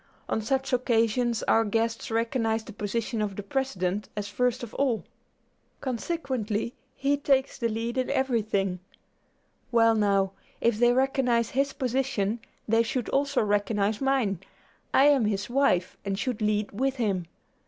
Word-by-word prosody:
On 220 Hz, -, 0 dB
such 265 Hz, +4 st, -1 dB
occasions 235 Hz, -1 st, +2 dB
our 225 Hz, -, +4 dB
guests 225 Hz, +1 st, -1 dB
recognize 225 Hz, -1 st, 0 dB
the 220 Hz, -, -10 dB
position 220 Hz, +2 st, -2 dB
of 205 Hz, -2 st, -2 dB
the 205 Hz, -, -5 dB
President 205 Hz, -5 st, -2 dB
as 205 Hz, -1 st, -2 dB
first 250 Hz, +3 st, 0 dB
of 235 Hz, -, -7 dB
all; 255 Hz, -5 st, 0 dB, 0.8 s
consequently, 250 Hz, -5 st, -2 dB, 0.2 s
he 280 Hz, +1 st, +1 dB
takes 275 Hz, -1 st, +1 dB
the 235 Hz, -2 st, +1 dB
lead 230 Hz, +3 st, -2 dB
in 255 Hz, -, -1 dB
everything; 210 Hz, -8 st, 0 dB, 0.9 s
well, 230 Hz, -1 st, +5 dB
now, 200 Hz, -3 st, +2 dB, 0.3 s
if 230 Hz, -2 st, +1 dB
they 240 Hz, 0 st, +5 dB
recognize 250 Hz, -3 st, +2 dB
his 275 Hz, +2 st, +1 dB
position 250 Hz, -5 st, -1 dB, 0.3 s
they 225 Hz, +1 st, +4 dB
should 235 Hz, +1 st, -2 dB
also 280 Hz, -2 st, +1 dB
recognize 205 Hz, +1 st, 0 dB
mine. 260 Hz, -9 st, +1 dB, 0.5 s
I 270 Hz, -, +5 dB
am 280 Hz, -5 st, +5 dB
his 205 Hz, +2 st, -1 dB
wife, 240 Hz, -10 st, +2 dB
and 195 Hz, -1 st, -2 dB
should 240 Hz, 0 st, -2 dB
lead 210 Hz, 0 st, +1 dB
with 265 Hz, +6 st, 0 dB
him. 195 Hz, -8 st, -1 dB
230 Hz, 145 wpm, -27 LUFS, 210-260 Hz, 0.9 s, well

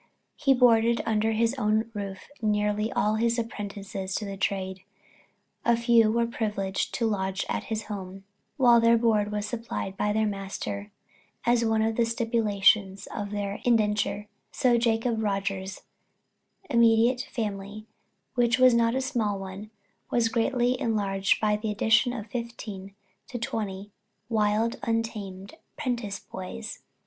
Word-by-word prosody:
He 275 Hz, -3 st, +3 dB
boarded 235 Hz, -2 st, +4 dB
under 220 Hz, 0 st, +1 dB
his 230 Hz, +2 st, +2 dB
own 215 Hz, +1 st, +1 dB
roof 200 Hz, -2 st, -6 dB
nearly 210 Hz, 0 st, +1 dB
all 215 Hz, +1 st, +1 dB
his 235 Hz, +1 st, +1 dB
apprentices 200 Hz, -4 st, -4 dB
to 215 Hz, -, -2 dB
the 200 Hz, -1 st, -5 dB
trade; 190 Hz, -1 st, -2 dB, 0.8 s
a 235 Hz, -1 st, +3 dB
few 235 Hz, -2 st, +4 dB
were 235 Hz, +1 st, +2 dB
privileged 210 Hz, -4 st, -2 dB
to 235 Hz, -, 0 dB
lodge 195 Hz, -3 st, -1 dB
at -, -, -2 dB, 0.2 s
home, 195 Hz, -2 st, -7 dB, 0.3 s
while 240 Hz, -3 st, +6 dB
their 230 Hz, 0 st, +5 dB
board 215 Hz, -3 st, +2 dB
was 210 Hz, 0 st, -2 dB
supplied 225 Hz, -3 st, -4 dB
by 210 Hz, +1 st, 0 dB
their 220 Hz, +1 st, +2 dB
master, 190 Hz, -, -4 dB, 0.5 s
as 235 Hz, 0 st, +3 dB
one 220 Hz, -1 st, +2 dB
of 225 Hz, 0 st, 0 dB
the 235 Hz, -, +3 dB
stipulations 210 Hz, -4 st, +2 dB
of 205 Hz, -1 st, -4 dB
their 205 Hz, 0 st, -3 dB
indenture; 210 Hz, -3 st, +1 dB, 0.2 s
so 250 Hz, -2 st, +3 dB
Jacob 230 Hz, -1 st, +1 dB
Rogers' 195 Hz, -2 st, -2 dB, 0.8 s
immediate 235 Hz, +1 st, +3 dB
family, 210 Hz, -1 st, -4 dB, 0.5 s
which 245 Hz, -1 st, +2 dB
was 255 Hz, -1 st, +6 dB
not 230 Hz, 0 st, +3 dB
a 265 Hz, -, +1 dB
small 235 Hz, -7 st, -1 dB
one, 195 Hz, +2 st, -8 dB, 0.4 s
was 230 Hz, -2 st, +2 dB
greatly 245 Hz, +2 st, +1 dB
enlarged 195 Hz, -3 st, +1 dB
by 210 Hz, -1 st, +2 dB
the 215 Hz, +1 st, -3 dB
addition 225 Hz, +4 st, +3 dB
of 225 Hz, -4 st, -5 dB
fifteen 220 Hz, -5 st, -6 dB, 0.3 s
to 250 Hz, -, -5 dB
twenty 205 Hz, -3 st, -4 dB, 0.4 s
wild, 220 Hz, +1 st, +1 dB
untamed 210 Hz, -4 st, -3 dB, 0.2 s
"prentice" 240 Hz, -8 st, -2 dB
boys. 215 Hz, +4 st, -7 dB
215 Hz, 135 wpm, -27 LUFS, 200-235 Hz, 0.8 s, while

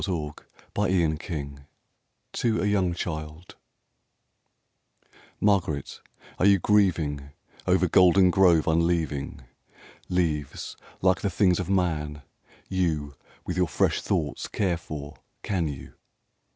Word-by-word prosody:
Spring 80 Hz, -6 st, -2 dB, 0.5 s
and 85 Hz, -6 st, +1 dB
Fall: 70 Hz, -4 st, -5 dB, 0.8 s
to 115 Hz, -2 st, 0 dB
a -, -, 0 dB
young 95 Hz, -4 st, +1 dB
child 80 Hz, 0 st, -6 dB, 1.8 s
MARGARET, 95 Hz, -9 st, 0 dB, 0.4 s
are 95 Hz, -, +4 dB
you 100 Hz, -1 st, +6 dB
grieving 85 Hz, -8 st, +1 dB, 0.4 s
Over 90 Hz, 0 st, +3 dB
Goldengrove 90 Hz, -2 st, +5 dB
unleaving? 80 Hz, -4 st, 0 dB, 0.7 s
Leaves, 80 Hz, -6 st, -2 dB, 0.3 s
like 95 Hz, -1 st, +3 dB
the 100 Hz, -, 0 dB
things 90 Hz, -1 st, +2 dB
of 90 Hz, -1 st, -3 dB
man, 75 Hz, -6 st, -1 dB, 0.4 s
you 80 Hz, -6 st, -1 dB, 0.3 s
With 90 Hz, -, -3 dB
your 90 Hz, -1 st, +2 dB
fresh -, -, +1 dB
thoughts 75 Hz, -4 st, -2 dB
care 90 Hz, -4 st, 0 dB
for, 75 Hz, -3 st, -8 dB, 0.3 s
can 90 Hz, -5 st, -1 dB
you 70 Hz, -3 st, -8 dB
85 Hz, 105 wpm, -26 LUFS, 75-95 Hz, 1.8 s, you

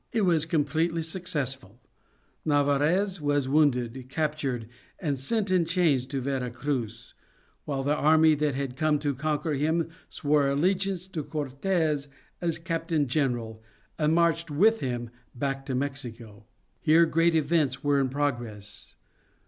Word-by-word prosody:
It 230 Hz, -, +1 dB
was 165 Hz, -5 st, +2 dB
completely 160 Hz, +2 st, 0 dB
successful; 135 Hz, -, -3 dB, 0.6 s
Narvaez 150 Hz, +6 st, +2 dB
was 145 Hz, -2 st, +1 dB
wounded, 130 Hz, -3 st, +1 dB
captured, 140 Hz, -6 st, -2 dB, 0.3 s
and 150 Hz, -7 st, -1 dB
sent 200 Hz, -, -1 dB
in 180 Hz, -2 st, +4 dB
chains 160 Hz, -7 st, +1 dB
to 135 Hz, 0 st, -3 dB
Vera 130 Hz, -1 st, -2 dB
Cruz, 120 Hz, -3 st, -4 dB, 0.5 s
while 135 Hz, -2 st, -2 dB
the 145 Hz, +2 st, +2 dB
army 155 Hz, +1 st, +5 dB
that 150 Hz, -2 st, 0 dB
had 135 Hz, -2 st, -3 dB
come 155 Hz, +1 st, +2 dB
to 145 Hz, -1 st, -1 dB
conquer 155 Hz, +3 st, -1 dB
him 160 Hz, +4 st, 0 dB, 0.2 s
swore 145 Hz, -1 st, +1 dB
allegiance 185 Hz, +5 st, 0 dB
to 160 Hz, -5 st, -4 dB
Cortes 150 Hz, +1 st, -1 dB, 0.3 s
as 165 Hz, -2 st, -1 dB
Captain 165 Hz, -2 st, -1 dB
General 120 Hz, -5 st, -1 dB, 0.4 s
and 155 Hz, +1 st, +3 dB
marched 165 Hz, -1 st, +2 dB
with 215 Hz, +10 st, +4 dB
him 120 Hz, -2 st, -3 dB, 0.2 s
back 135 Hz, +1 st, -3 dB
to 130 Hz, -, -1 dB
Mexico. 120 Hz, -6 st, -5 dB, 0.3 s
Here 165 Hz, +2 st, +5 dB
great 165 Hz, +1 st, +2 dB
events 150 Hz, -4 st, +1 dB
were 145 Hz, -1 st, +3 dB
in 130 Hz, -, 0 dB
progress. 120 Hz, -7 st, -4 dB
145 Hz, 135 wpm, -27 LUFS, 135-165 Hz, 0.6 s, army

